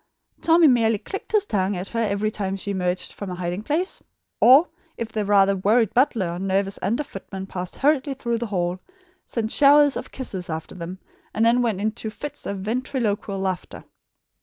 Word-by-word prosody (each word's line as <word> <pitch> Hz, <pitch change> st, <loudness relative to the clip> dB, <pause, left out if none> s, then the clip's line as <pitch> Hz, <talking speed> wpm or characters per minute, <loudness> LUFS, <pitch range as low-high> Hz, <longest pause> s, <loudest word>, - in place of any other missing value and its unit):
Tommy 330 Hz, 0 st, +5 dB
merely 225 Hz, -4 st, +3 dB
clicked 390 Hz, -, -7 dB
his 425 Hz, -2 st, +3 dB
tongue 195 Hz, -, 0 dB
at 180 Hz, +2 st, -5 dB
her 230 Hz, -, -3 dB
every 215 Hz, -1 st, 0 dB
time 195 Hz, -2 st, -3 dB
she 200 Hz, +1 st, -4 dB
emerged 180 Hz, -1 st, -2 dB
from 200 Hz, -, -6 dB
a 180 Hz, -, -4 dB
hiding 180 Hz, +2 st, -3 dB
place; 320 Hz, -, -1 dB, 0.4 s
or, 275 Hz, +8 st, +7 dB, 0.3 s
if 230 Hz, -1 st, -4 dB
the 215 Hz, -1 st, -1 dB
rather 200 Hz, -1 st, +4 dB
worried 210 Hz, +3 st, +2 dB
butler 240 Hz, -7 st, +2 dB
or 175 Hz, -, -5 dB
nervous 195 Hz, +1 st, -1 dB
under 240 Hz, +8 st, 0 dB
footman 195 Hz, -5 st, -8 dB
passed 180 Hz, -2 st, -6 dB
hurriedly 280 Hz, -1 st, +1 dB
through 235 Hz, -3 st, -2 dB
the 235 Hz, -, -3 dB
hall, 180 Hz, -2 st, -1 dB, 0.5 s
sent 225 Hz, -2 st, -2 dB
showers 290 Hz, 0 st, +6 dB
of -, -, -5 dB
kisses 190 Hz, -9 st, -5 dB
after 160 Hz, 0 st, -5 dB
them, 180 Hz, +1 st, -7 dB, 0.4 s
and 220 Hz, -, +3 dB
then 240 Hz, +2 st, +4 dB
went 225 Hz, -6 st, 0 dB
into 220 Hz, +1 st, -2 dB
fits 290 Hz, +7 st, -7 dB
of 200 Hz, -1 st, -4 dB
ventriloquial 220 Hz, -2 st, -2 dB
laughter. 190 Hz, -2 st, -4 dB
210 Hz, 185 wpm, -23 LUFS, 190-245 Hz, 0.5 s, or